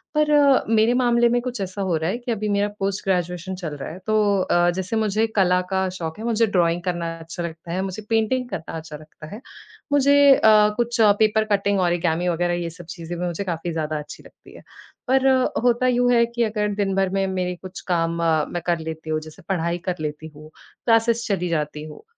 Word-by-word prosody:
पर 300 0 +2
अ, 285 -2 +5
मेरे 225 +1 +3
मामले 240 -1 +3
में 245 +1 +1
कुछ 250 -2 -5
ऐसा 190 +1 -4
हो 185 -3 0
रहा 160 +2 -2
है 230 - -2
कि 240 -1 -5
अभी 215 -1 -2
मेरा 205 0 +1
पोस्ट 195 0 -2
ग्रेजुएशन 180 0 -2
चल 165 -5 -6
रहा - - -6
है। 180 - -9
तो 215 - +1 0.3
अ, 175 -1 +2
जैसे 190 +4 -3
मुझे 220 0 +1
कला 180 -2 +3
का 190 0 +1
शौक 160 -2 -5
है, - - -6
मुझे 230 -1 +2
ड्राइंग 175 -3 +1
करना 170 -2 -2
अच्छा 165 +1 -7
लगता 165 0 -7
है, 185 +2 -1
मुझे 195 +2 -5
पेंटिंग 225 +3 +1
करना 165 - -6
अच्छा 160 -1 -8
लगता 155 0 -13
है। 225 - -10 0.5
मुझे 285 0 +4 0.2
अ, 215 -2 +5
कुछ 235 0 -1 0.2
पेपर 215 0 +3
कटिंग, 200 0 +1
ओरिगामी 175 0 0
वग़ैरह 175 +1 0
ये 170 - -3
सब 170 +1 -12
चीज़ें 170 +1 -6
भी 180 - -2
मुझे 175 +3 -3
काफ़ी 170 -2 -4
ज़्यादा 155 -1 -2
अच्छी 150 - -10
लगती - - -18
है। - - -12 0.5
पर 265 +1 +3 0.4
होता 245 +1 +2
यूँ 245 0 +2
है 235 -1 +4
कि 235 0 -2
अगर 210 -1 -1
दिन 195 -2 -1
भर 195 -1 +1
में 195 0 0
मेरे 180 -1 -2
कुछ 185 0 -9
काम 165 0 0
अ, 160 -2 +2
मैं 175 - -4
कर 170 -1 +1
लेती 160 0 -7
हूँ, 155 - 0
जैसे 155 +4 -13
पढ़ाई 170 -2 0
कर 180 - -1
लेती 150 +1 -5
हूँ, 155 +1 -13 0.4
क्लासेस 230 0 +2
चली 180 -4 -1
जाती 150 -2 -2
हूँ। 155 - -11
185 Hz, 220 wpm, -22 LUFS, 170-225 Hz, 0.5 s, अ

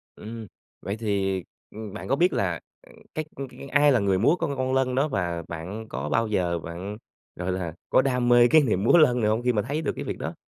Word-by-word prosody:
Ừm, 110 0 -8 0.3
vậy 100 +3 -4
thì, 95 -4 -1 0.3
ừm, 110 -2 -8
bạn 105 - -7
có 135 - +2
biết 175 +5 +3
là, 90 -5 0 0.3
ừm, - - -17 0.2
cái 155 -1 -3
c 140 -2 -9
ai 145 0 +5
là 125 - +4
người 100 -2 +2
múa 145 - +4
con 145 -4 -1
con 130 0 -1
Lân 130 -1 +1
đó? 140 +3 +2
Và 85 - -2
bạn 90 +7 -6
có 70 +3 -4
bao 115 +8 +1
giờ 90 -5 0
bạn, 90 +6 -7 0.4
gọi 90 +1 -3
là, 90 -3 -3 0.2
có - - +5
đam 125 -2 0
mê 120 0 +7
cái 155 +4 +6
niềm 105 -7 0
múa 145 - +6
Lân 125 -6 +5
này 105 -1 +2
hông 110 +2 +1
khi 125 -1 +2
mà 105 - +1
thấy 145 +7 -3
được 145 - -1
cái - - -5
việc - - -4
đó? - - -4
110 Hz, 245 wpm, -25 LUFS, 95-130 Hz, 0.4 s, mê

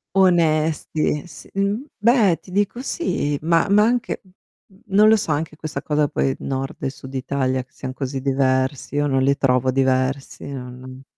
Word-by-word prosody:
Onesti, 160 -4 +2
e - - -14
sì - - -13
uhm, 200 +6 -1
beh, 215 - +4
ti - - -17
dico 205 +5 0
sì, 145 - -1
ma 165 +2 +3
ma 205 +1 +5
anche 240 +1 0 0.7
non 210 +2 +5
lo 220 - +7
so, 180 -7 -1
anche 155 +1 -2
questa 155 -1 -5
cosa 150 -1 +1
poi 135 -1 0
Nord 135 0 -4
e - - 0
Sud 130 0 -11
Italia 130 -1 -1
che 130 - -33
sian 130 -1 -6
così 135 0 -4
diversi, 130 0 0
io 145 0 +2
non 135 -2 +1
li 140 +1 +2
trovo 130 -1 +2
diversi, 130 +1 0
non 130 0 -9
145 Hz, 170 wpm, -22 LUFS, 130-180 Hz, 0.7 s, lo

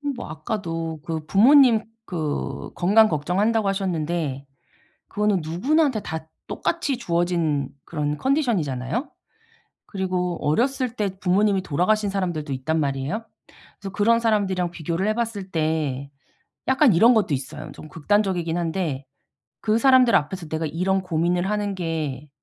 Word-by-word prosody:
뭐 245 - -7
아까도 165 -1 -4
그 160 -2 -4
부모님 235 - +6 0.2
그 150 -6 -3
건강 210 +5 +5
걱정한다고 195 +8 +1
하셨는데 170 -7 -2 0.6
그거는 210 -2 +1
누구나한테 260 - +1
다 160 -4 -6 0.2
똑같이 300 -5 -1
주어진 170 - 0 0.2
그런 150 -2 -2
컨디션이잖아요? 235 - 0 0.8
그리고 180 -3 -2
어렸을 250 - +1
때 210 -3 0
부모님이 195 +1 +2
돌아가신 200 +6 +1
사람들도 175 -7 -2
있단 160 +5 -1
말이에요. 140 +9 -2 0.5
그래서 195 -1 -7
그런 230 +3 +3
사람들이랑 195 -6 +1
비교를 170 +3 -2
해봤을 215 -4 -3
때 155 -4 -1 0.6
약간 265 -3 +5
이런 230 +9 +6
것도 205 -9 +2
있어요. 130 -1 -5
좀 155 - -11
극단적이긴 175 +1 0
한데 165 -5 -2 0.6
'그 215 0 +2
사람들 255 -1 +5
앞에서 165 +3 -1
내가 160 +1 -2
이런 185 +5 0
고민을 175 +1 0
하는 205 -1 -1
게 155 -5 -3
180 Hz, 320 characters per minute, -23 LUFS, 160-215 Hz, 0.8 s, 부모님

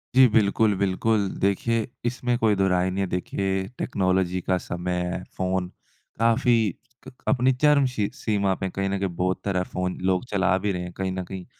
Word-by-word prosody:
जी। 130 0 +8
बिल्कुल, 110 -1 +3
बिल्कुल। 100 +2 +1
देखिए 110 +4 +1 0.2
इसमें 125 0 0
कोई 110 -3 +3
दोहराय 95 -1 +2
नहीं 95 - -3
है - - -1
देखिए, 95 +1 -2
टेक्नोलॉज़ी 95 -4 0
का 95 +1 +1
समय 90 0 -4
हैं। 90 0 -3
फ़ोन 95 -1 0 0.5
काफ़ी 115 +1 +3 0.5
क - - -8 0.2
अपनी 130 -1 +3
चर्म 150 -2 +5
शी 105 -5 -1
सीमा 100 -7 0
पे 95 0 -3
कहीं 95 +1 -2
न 100 - -1
कहीं 95 -1 -1
बहुत 90 +2 0
तरह 95 -2 0
फ़ोन 90 0 -3
लोग 95 +4 +1
चला 95 -2 +2
भी 100 - +2
रहे 90 -2 -3
हैं 90 0 -6
कहीं 95 -1 -1
न 95 0 -3
कहीं 95 -2 -6
95 Hz, 185 wpm, -25 LUFS, 95-110 Hz, 0.5 s, जी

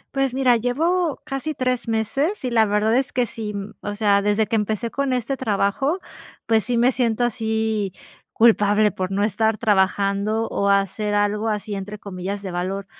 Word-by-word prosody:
Pues 270 -2 0
mira, 255 -3 +4
llevo 315 +7 0
casi 295 +1 -4
3 255 -2 -1
meses, 270 - -1
y 250 - -1
la 225 -2 +4
verdad 210 +2 +1
es 265 0 +1
que 250 -1 +1
sí, 215 -2 -6
mm, 200 +1 -6
o 205 - -4
sea, 205 -2 +3
desde 210 +1 +2
que 225 - -2
empecé 220 +2 -1
con 275 -1 -1
este 255 +2 -1
trabajo, 235 - 0 0.5
pues 220 -2 +2
sí, 240 -1 0
me 245 +2 +4
siento 240 -2 0
así 220 -4 -1 0.4
culpable 210 -2 +4
por 185 +1 -3
no 200 +1 0
estar 220 +1 +1
trabajando, 200 +1 +1
o 200 - 0
hacer 200 +1 +1
algo 205 +1 +1
así, 210 0 -3
entre 200 +2 -5
comillas 200 0 -6
"de 190 - -5
valor". 185 +3 -3
220 Hz, 180 wpm, -22 LUFS, 205-245 Hz, 0.5 s, mira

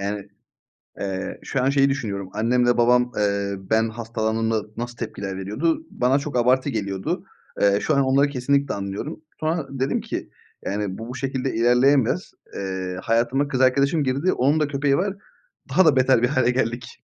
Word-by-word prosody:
Yani, 100 0 -4 0.7
eee, 95 -1 -4
şu 135 -2 -1
an 135 - +3
şeyi 140 0 +3
düşünüyorum. 100 -8 -3
Annemle 120 +3 +2
babam, 125 +1 +4
eee, 100 -1 0
ben 110 +4 +1
hastalandığımda 110 -1 -1
nasıl 120 0 -5
tepkiler 100 -4 -5
veriyordu? 135 - -1
Bana 130 +3 +2
çok 145 -2 -6
abartı 130 +3 +3
geliyordu. 100 -5 -3 0.4
Eee, 100 0 +4
şu 155 - +1
an 140 - +4
onları 135 +2 +3
kesinlikle 140 +1 0
anlıyorum. 100 +11 -5 0.2
Sonra 155 -2 -1
dedim 135 0 -1
ki - - -5 0.4
yani 100 -1 -2
bu, 115 +1 -7
bu 125 - -6
şekilde 135 0 -2
ilerleyemez. 125 - +3 0.2
Eee, 95 -1 -4
hayatıma 120 +5 +1
kız 130 -2 -1
arkadaşım 140 +4 +3
girdi. 140 +7 +1
Onun 145 +5 +2
da 150 - +1
köpeği 140 -1 +1
var. 195 +2 -1 0.5
Daha 190 - +4
da 150 -4 +5
beter 130 -2 +4
bir - - +5
hâle 130 -3 +2
geldik. 120 -2 -3
125 Hz, 165 wpm, -23 LUFS, 105-140 Hz, 0.7 s, da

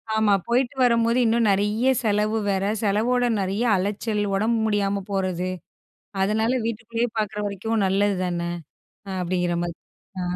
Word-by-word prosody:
ஆமா, 220 -2 +3
போயிட்டு 245 +3 +1
வரும்போது 235 0 +3
இன்னும் 230 0 +2
நெறைய 210 +6 +2
செலவு 215 0 +1
வேற, 195 0 0 0.2
செலவோட 225 +4 +1
நெறைய 195 +4 -1
அலைச்சல், 205 +3 -1
உடம்பு 225 +3 +1
முடியாம 200 -2 0
போறது. 185 -2 -1 0.7
அதனால 220 +4 +1
வீட்டுக்குள்ளே 230 +1 -2
பாக்கிற 210 -1 -2
வரைக்கும் 210 +2 -1
நல்லது 200 +1 +2
தானே? 170 -1 -2 0.6
அ - - -5
அப்டிங்கிற 175 -1 0
மாதிரி. 170 -1 -5 0.4
ஆ. - - -2
210 Hz, 135 wpm, -24 LUFS, 195-230 Hz, 0.7 s, ஆமா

